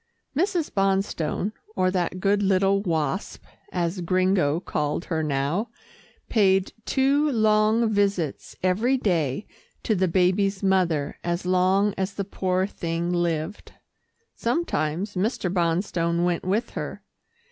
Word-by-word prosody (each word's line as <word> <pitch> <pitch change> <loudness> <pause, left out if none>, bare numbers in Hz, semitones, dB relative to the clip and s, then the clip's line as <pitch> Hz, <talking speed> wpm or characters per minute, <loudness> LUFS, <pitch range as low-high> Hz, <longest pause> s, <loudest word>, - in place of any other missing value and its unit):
Mrs. 345 0 0
Bonstone, 195 -1 0 0.2
or 185 0 +2
that 185 0 -1
good 200 +1 +2
little 195 0 +3
Wasp, 165 -2 -2 0.3
as 175 +1 -1
Gringo 185 -3 +2
called 150 -1 -2
her 160 -2 -1
now, 150 - -1 0.6
paid 195 -3 +2
two 280 +3 +2
long 220 0 +3
visits 200 -7 -1
every 220 +9 +2
day 170 - 0 0.4
to 220 - +1
the 185 -2 +2
baby's 190 +3 +1
mother 175 -7 +1
as 175 +1 -2
long 185 +3 +3
as 190 +1 -2
the 200 - -2
poor 185 -1 0
thing 170 -3 -3
lived. 170 +2 -2 0.6
Sometimes 200 - -1
Mr. 185 -2 -1
Bonstone 170 -1 0
went 175 -1 0
with 205 +5 0
her. - - -6
185 Hz, 120 wpm, -25 LUFS, 170-205 Hz, 0.6 s, little